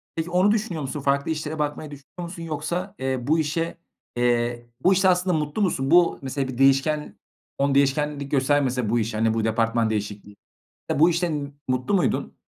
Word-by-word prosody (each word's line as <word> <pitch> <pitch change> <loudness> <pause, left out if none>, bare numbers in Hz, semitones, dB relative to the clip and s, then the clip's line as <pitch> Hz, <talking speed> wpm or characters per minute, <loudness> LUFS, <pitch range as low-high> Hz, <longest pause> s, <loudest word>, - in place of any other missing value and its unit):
Peki 165 +1 -3
onu 185 +3 +3
düşünüyor 210 -7 -1
musun? 140 +2 -4
Farklı 140 +3 +1
işlere 155 0 -4
bakmayı 150 0 -3
düşünüyor 145 +5 -10
musun? 170 -2 -8
Yoksa, 170 +5 -4
eee, 130 0 -1
bu 160 +2 +3
işe, 160 +2 -2 0.4
eee, 120 0 0 0.2
bu 190 - +5
işte 190 +1 +3
aslında 180 -2 +2
mutlu 150 +7 -2
musun? 135 -8 0
Bu 175 0 +5
mesela 135 0 -3
bir 130 - -6
değişken 135 +3 +2 0.4
on 140 0 +1
değişkenlik 140 +1 +1
göstermese 135 -4 +1
bu 120 +1 +2
iş, 110 0 -2
hani, 110 +1 +1
bu 115 -1 -1
departman 115 0 +1
değişikliği, 105 -1 -4 0.6
bu 165 +3 +6
işten 155 -5 -2 0.2
mutlu 130 +8 0
muydun? 175 -9 0
145 Hz, 175 wpm, -24 LUFS, 130-165 Hz, 0.6 s, bu